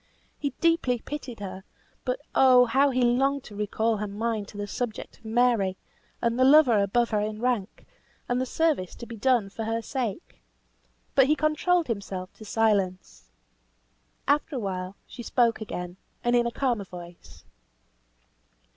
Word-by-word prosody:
He 285 - -1
deeply 330 -7 +2
pitied 250 -3 -7
her; 190 -1 -6 0.4
but 250 -1 -1
oh! 255 -2 +6
how 270 +4 +3
he 255 -1 +1
longed 270 +3 +2
to 210 - -11
recall 215 +2 0
her 210 +1 -3
mind 215 0 -2
to 205 - -11
the 205 - -3
subject 220 +2 -5
of - - -25
Mary, 220 -5 +2 0.5
and 235 +1 +1
the - - +5
lover 265 -5 +6
above 235 +5 +1
her 210 - +2
in 215 0 -3
rank, 240 -5 -2 0.4
and 245 +1 0
the 260 - -2
service 300 - 0
to 235 - -9
be 235 - -8
done 225 -3 +2
for 225 +2 -5
her 225 +1 -1
sake. 255 - -4 0.7
But 270 -1 +5
he 305 - +4
controlled 310 +3 +2
himself 195 -6 -5
to 215 - -11
silence. 200 -4 0 1.0
After 290 +1 +1
awhile, 190 -4 -3
she 245 - -10
spoke 235 -1 +1
again, 180 -4 -5 0.3
and 240 0 +2
in 240 0 +3
a - - -2
calmer 240 -6 -1
voice. 175 -1 -12
235 Hz, 160 wpm, -27 LUFS, 205-255 Hz, 1.0 s, oh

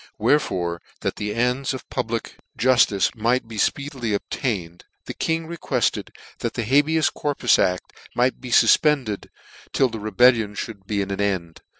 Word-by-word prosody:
Wherefore, 90 - +1 0.2
that - - -2
the 105 0 -3
ends 125 +3 0
of 130 - -9
public 115 -2 -3 0.2
juftice 125 -6 +3
might 120 +2 +1
be 110 -1 -8
fpeedily 130 - -1
obtained, 95 - -4 0.2
the - - -5
King 160 0 -1
requested 170 +1 -1 0.3
that - - -3
the 120 - -1
habeas 145 +6 +3
corpus 145 -4 +1
aft 90 -1 0 0.2
might 125 +1 +1
be 130 - -7
fufpended 130 -4 +3 0.5
till 130 - +3
the 115 - -6
rebellion 110 0 +3
mould 100 -4 -12
be 100 -2 0
at 100 - -6
an 100 - -2
end. 95 -5 -2
115 Hz, 155 wpm, -23 LUFS, 100-130 Hz, 0.5 s, juftice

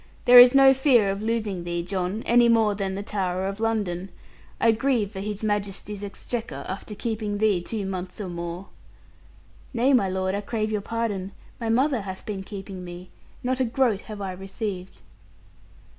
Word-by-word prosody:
There 245 0 +10
is 245 +2 +9
no 270 -1 +8
fear 255 -7 +4
of 195 +1 -4
losing 215 -5 -2
thee, 175 0 -2
John, 185 +3 -3
any 240 0 +5
more 225 -2 +4
than 195 -1 -3
the 200 - -4
Tower 190 -3 -2
of 195 +2 -4
London. 200 -5 -1 0.5
I 230 - +5
grieve 225 -3 0
for 190 - -7
His 210 +1 -4
Majesty's 205 -1 -3
exchequer, 205 - -5
after 195 +3 -6
keeping 215 -2 -3
thee 205 -4 +2
two 205 +3 -4
months 185 0 -5
or 205 - -4
more.' 175 +1 -6 1.1
'Nay, 255 +4 +3
my 200 -7 +3
lord, 185 0 -1
I 200 - -1
crave 215 +1 -2
your 210 -1 -1
pardon. 205 -4 -3 0.3
My 230 -2 -2
mother 255 +1 +2
hath 190 -1 -7
been 200 -3 -4
keeping 195 -1 -8
me. 175 +1 -9 0.3
Not 255 +1 0
a - - +3
groat 235 -4 +1
have 210 -2 -8
I 195 -1 -3
received.' 190 0 -6
205 Hz, 175 wpm, -25 LUFS, 190-230 Hz, 1.1 s, There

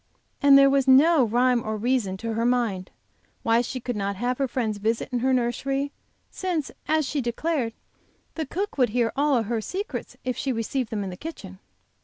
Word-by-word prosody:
And 280 -1 +8
there 275 0 +7
was 275 -1 +2
no 285 +3 +6
rhyme 240 +1 +2
or 215 0 -3
reason, 220 -4 0
to 230 +3 -4
her 225 +1 -1
mind, 235 -7 0 0.5
why 230 +1 +3
she 255 +2 -4
could 245 0 -4
not 200 -1 -2
have 245 +5 -2
her 275 - +1
friends 220 -5 -2
visit 225 +5 -1
in 245 - 0
her 260 +2 +1
nursery, 270 +3 0 0.4
since, 350 -6 -2 0.2
as 310 0 +2
she 285 +1 -1
declared, 245 0 -1 0.6
the 315 -3 -4
cook 385 0 -4
would 250 -3 +4
hear 235 +1 +1
all 280 -4 +2
her 225 +1 -2
secrets 385 - -5
if 255 -1 -2
she 270 - -2
received 235 +1 -2
them 210 -2 -2
in 190 - -5
the 180 - -8
kitchen. 190 - -9
250 Hz, 195 wpm, -25 LUFS, 225-275 Hz, 0.6 s, And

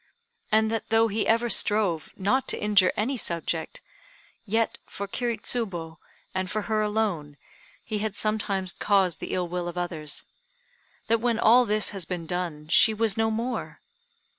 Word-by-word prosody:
And 220 0 +3
that 225 - -3
though 225 0 +3
he 215 +1 -1
ever 230 +2 +3
strove 205 -8 +2
not 230 +8 +1
to - - +1
injure 205 -3 +4
any 255 +6 0
subject, 170 -4 -2 0.6
yet 225 +2 0
for 200 - -6
Kiri 235 +3 -2
Tsubo, 175 -9 -3 0.3
and 185 -1 -2
for 215 +1 -2
her 215 0 0
alone, 205 -9 -1 0.5
he 215 -2 -3
had 210 -1 -3
sometimes 200 -4 0
caused 195 -5 +1
the - - -4
ill 180 -1 -1
will 175 0 -3
of 175 0 -6
others; 165 -4 -2 0.8
that 230 0 +1
when 235 -1 +1
all 240 +2 +5
this 215 -1 +2
has 195 -4 -3
been 175 -1 -5
done, 165 -3 -4
she 220 +6 +6
was 220 -2 +2
no 225 0 +1
more! 230 +3 -3
210 Hz, 165 wpm, -26 LUFS, 180-225 Hz, 0.8 s, she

